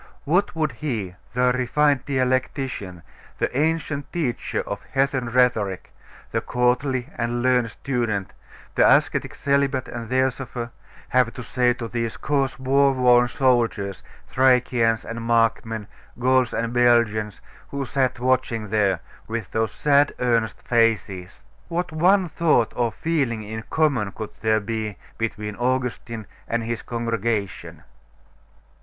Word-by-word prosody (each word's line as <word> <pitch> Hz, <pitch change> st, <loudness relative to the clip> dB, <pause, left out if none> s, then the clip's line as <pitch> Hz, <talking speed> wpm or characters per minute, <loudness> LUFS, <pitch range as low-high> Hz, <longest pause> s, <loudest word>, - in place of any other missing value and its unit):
What 180 Hz, +5 st, +1 dB
would 155 Hz, -3 st, 0 dB
he, 115 Hz, -8 st, -4 dB, 0.2 s
the 125 Hz, 0 st, +3 dB
refined 135 Hz, +2 st, +2 dB
dialectician, 130 Hz, -, -1 dB, 0.3 s
the -, -, -1 dB
ancient 155 Hz, -1 st, -1 dB
teacher 150 Hz, -9 st, -2 dB
of 100 Hz, 0 st, -5 dB
heathen 135 Hz, -2 st, +1 dB
rhetoric, 115 Hz, -6 st, +1 dB, 0.4 s
the -, -, 0 dB
courtly 125 Hz, +1 st, 0 dB
and 120 Hz, +1 st, -1 dB
learned 125 Hz, -2 st, +3 dB
student, 110 Hz, -5 st, -2 dB, 0.4 s
the -, -, +4 dB
ascetic -, -, -3 dB
celibate 140 Hz, -2 st, +1 dB
and 115 Hz, -2 st, -6 dB
theosopher, 130 Hz, -2 st, -1 dB, 0.4 s
have 125 Hz, -2 st, +3 dB
to 125 Hz, -, -6 dB
say 125 Hz, 0 st, +2 dB
to 115 Hz, -2 st, -5 dB
those 115 Hz, -1 st, -3 dB
coarse 140 Hz, -3 st, 0 dB
war 135 Hz, +1 st, +3 dB
worn 125 Hz, -1 st, +5 dB
soldiers, 120 Hz, -7 st, +1 dB, 0.3 s
Thracians 125 Hz, -3 st, +3 dB
and 115 Hz, 0 st, -5 dB
Markmen, 115 Hz, -1 st, +1 dB, 0.3 s
Gauls 130 Hz, -1 st, +3 dB
and 115 Hz, +1 st, -2 dB
Belgians, 115 Hz, -4 st, +2 dB, 0.3 s
who 140 Hz, -1 st, -3 dB
sat 130 Hz, +1 st, 0 dB
watching 120 Hz, -4 st, 0 dB
there, 100 Hz, -5 st, +2 dB, 0.3 s
with 115 Hz, -3 st, -4 dB
those 110 Hz, -1 st, 0 dB
sad 145 Hz, 0 st, +3 dB
earnest 115 Hz, -4 st, 0 dB
faces? 110 Hz, -8 st, 0 dB, 0.2 s
What 175 Hz, 0 st, -2 dB
one 180 Hz, +4 st, +3 dB
thought 155 Hz, -8 st, +2 dB
or 120 Hz, -2 st, +1 dB
feeling 135 Hz, -10 st, -1 dB
in 110 Hz, +1 st, -6 dB
common 135 Hz, -11 st, +1 dB
could 110 Hz, -2 st, -6 dB
there 110 Hz, -1 st, +3 dB
be 110 Hz, -2 st, -3 dB, 0.2 s
between 105 Hz, -2 st, -3 dB
Augustine 120 Hz, -3 st, -2 dB, 0.2 s
and 115 Hz, 0 st, -1 dB
his 115 Hz, 0 st, -3 dB
congregation? 115 Hz, -4 st, -3 dB
120 Hz, 125 wpm, -23 LUFS, 115-130 Hz, 0.4 s, worn